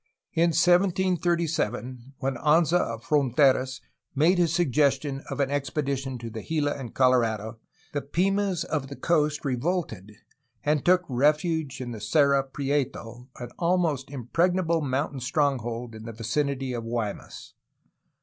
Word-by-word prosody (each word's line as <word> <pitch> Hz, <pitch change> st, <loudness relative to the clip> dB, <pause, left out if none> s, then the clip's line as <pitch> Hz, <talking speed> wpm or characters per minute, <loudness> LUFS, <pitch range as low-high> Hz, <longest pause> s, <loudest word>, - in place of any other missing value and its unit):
In 170 Hz, +1 st, +3 dB
1737, 170 Hz, -, +1 dB
when 135 Hz, +1 st, -1 dB
Anza 165 Hz, +4 st, +3 dB
of 115 Hz, -7 st, -3 dB
Fronteras 130 Hz, -2 st, +2 dB, 0.3 s
made 170 Hz, +6 st, +3 dB
his 170 Hz, -3 st, +3 dB
sug 170 Hz, -4 st, +1 dB
gestion 135 Hz, 0 st, +1 dB
of 135 Hz, 0 st, -5 dB
an 140 Hz, -1 st, +1 dB
expedition 140 Hz, -2 st, -2 dB
to 115 Hz, -1 st, -7 dB
the 110 Hz, 0 st, -6 dB
Gila 150 Hz, 0 st, -1 dB
and 130 Hz, -5 st, -8 dB
Colorado, 115 Hz, -4 st, +1 dB, 0.3 s
the 145 Hz, -, -1 dB
Pimas 190 Hz, +4 st, 0 dB
of 145 Hz, -4 st, -3 dB
the 140 Hz, -, -8 dB
coast 150 Hz, -2 st, 0 dB
revolted 125 Hz, -, -2 dB, 0.5 s
and 150 Hz, -1 st, +1 dB
took 180 Hz, 0 st, +4 dB
refuge 150 Hz, +2 st, +1 dB
in 125 Hz, -2 st, -5 dB
the 110 Hz, -3 st, -7 dB
Cerro 140 Hz, +4 st, +3 dB
Prieto, 135 Hz, -3 st, -3 dB
an 120 Hz, -, -6 dB
almost 170 Hz, -6 st, +1 dB
impregnable 165 Hz, +6 st, 0 dB
mountain 140 Hz, 0 st, -2 dB
stronghold 125 Hz, -4 st, -1 dB
in 110 Hz, 0 st, -10 dB
the 115 Hz, -, -7 dB
vicinity 130 Hz, +4 st, -2 dB
of 120 Hz, -1 st, -4 dB
Guaymas. 115 Hz, -3 st, -5 dB
140 Hz, 135 wpm, -26 LUFS, 125-160 Hz, 0.5 s, took